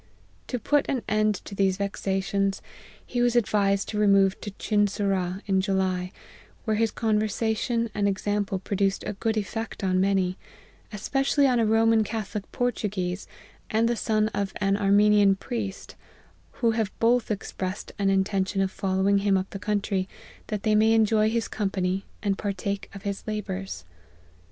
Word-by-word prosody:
To 250 - -2
put 290 +5 +1
an 260 -4 -1
end 215 0 +2
to - - -8
these 195 -1 +1
vexa 195 -1 -1
tions, 195 0 -1 0.4
he 245 - -2
was 245 0 +2
advised 200 -4 +2
to 210 - -2
remove 195 -2 +4
to 210 - -5
Chinsurah 195 -2 0
in 190 -2 +2
July; 190 -2 0 0.5
where 215 -2 +1
his 225 0 +2
conversation 220 +2 0
and 205 -1 +1
example 200 0 -1
produc 195 +1 -1
ed - - -6
a - - -2
good 220 +2 -1
effect 225 +1 -4
on 185 -1 +2
many, 190 -1 +1 0.5
especially 270 +7 +1
on 250 -3 +3
a 225 - +3
Roman 225 0 +4
Catholic 210 -2 -5
Portuguese, 210 -6 -2 0.4
and 225 +1 +2
the 240 - +1
son 215 -1 +1
of 200 -2 -3
an 195 -1 +1
Armenian 205 0 +4
priest, 205 -2 -5 0.7
who 230 - +5
have 220 -2 -1
both 235 +1 +2
expressed 195 -2 -4
an 195 -1 +2
intention 195 0 +1
of 190 -1 +1
following 195 +1 +1
him 195 -1 +2
up 190 +1 -3
the 195 - -6
country, 200 -2 -1 0.4
that 210 -2 -3
they 215 - +2
may 220 +1 +5
enjoy 220 -1 +3
his 230 0 -1
company, 195 -2 -1 0.2
and 200 -2 0
partake 200 0 -3
of 195 - -9
his 200 -2 -3
labours." 195 - -4
205 Hz, 160 wpm, -26 LUFS, 195-220 Hz, 0.7 s, who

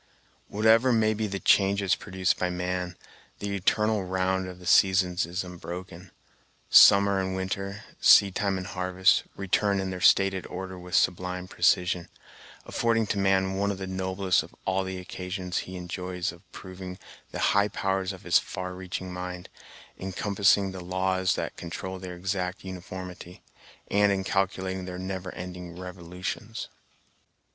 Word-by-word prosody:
Whatever 110 +4 +4
may 110 -2 +3
be 110 0 -2
the 100 -1 -4
changes 100 -1 +3
produced 95 -2 -1
by 90 - 0
man, 90 0 -3 0.4
the 100 -1 -3
eternal 105 +2 +1
round 95 0 0
of 90 -1 -8
the 90 - -13
seasons 90 -1 +4
is 90 +3 -3
unbroken. 90 0 -8 0.6
Summer 100 -1 +8
and 95 0 -2
winter, 100 +2 -4 0.2
seed 100 -2 +7
time 100 -1 0
and 90 - -5
harvest, 90 0 +2
return 100 +1 +1
in 95 0 -2
their 90 -1 -6
stated 95 0 +4
order 95 +1 -6
with 90 0 -5
a - - +7
sublime 90 +1 0
precision, 90 -1 +1 0.6
affording 115 -1 +1
to 100 - -1
man 95 -1 +2
one 100 +1 +1
of 100 - -2
the 95 - -5
noblest 95 0 0
of - - -13
all 95 +1 +1
the 95 0 -5
occasions 90 0 -4
he 95 - -7
enjoys 90 0 -4
of 90 +2 -18
proving 95 0 -8 0.3
the - - -6 0.2
high 100 +1 +4
powers 95 -1 -1
of 95 - -10
his - - +4
far 90 0 -6
reaching 90 0 -6
mind, 90 0 -6 0.5
in 95 0 -5
compassing 100 0 +2
the 95 -1 -7
laws 95 0 0
that - - -4
control 95 +2 -6
their 90 -1 -7
exact 90 0 -3
uniformity, 90 -1 -8 0.5
and 100 0 +4
in 95 -1 0
calculating 95 -1 -1
their 90 -1 -6
never 95 0 -5
ending 90 -1 -7
revolutions. 90 +4 -6
95 Hz, 155 wpm, -27 LUFS, 90-95 Hz, 0.6 s, Summer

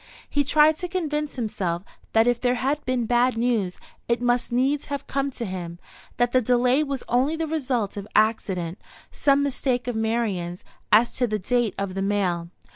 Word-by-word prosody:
He 285 - +1
tried 300 +2 +4
to 360 - -3
convince 300 -5 -2
himself 190 -8 -2 0.3
that 225 0 +5
if 245 0 +1
there 250 0 +2
had 275 +4 -1
been 255 -2 0
bad 245 +1 +2
news, 225 -6 0 0.3
it 235 0 +1
must 245 0 +1
needs 270 +4 +1
have 280 -1 -4
come 275 0 -1
to 245 -3 -5
him; 175 -3 -5 0.4
that 245 0 +2
the 255 - +4
delay 250 +4 +3
was 275 -3 -4
only 260 +6 +2
the 325 0 -2
result 260 -9 -1
of 200 0 -5
accident, 195 -5 +1 0.3
some 280 -1 +3
mistake 255 -3 -1
of 245 - -2
Marian's 220 -6 -1 0.3
as 225 +3 +5
to 245 - +2
the 215 -1 -1
date 230 +1 0
of 200 -1 -3
the 195 - -3
mail. 185 -4 0
245 Hz, 185 wpm, -24 LUFS, 205-275 Hz, 0.4 s, that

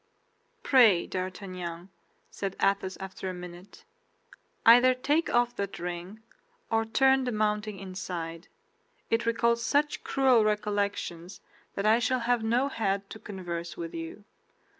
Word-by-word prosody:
"Pray, 225 -10 +5
D'Artagnan," 185 -2 -5 0.4
said 195 -1 -4
Athos, 195 -1 +1
after 190 0 -6
a 185 - -5
minute, 180 +2 -11 0.8
"either 245 +2 +7
take 295 +6 +1
off 240 0 +2
that 200 -1 -3
ring 180 +5 -6 0.5
or 225 0 +2
turn 265 +3 +3
the 250 - -1
mounting 210 -1 -1
inside; 180 -3 -6 0.6
it 230 0 +1
recalls 235 0 +2
such 295 +5 +1
cruel 260 -4 +3
recollections 205 -4 -2 0.4
that 200 - -2
I 220 +2 +5
shall 250 +1 0
have 240 -1 +1
no 240 +5 +2
head 200 -6 -2
to 220 - -8
converse 175 -4 -6
with 165 0 -6
you. 165 +5 -7
205 Hz, 130 wpm, -28 LUFS, 185-235 Hz, 0.8 s, either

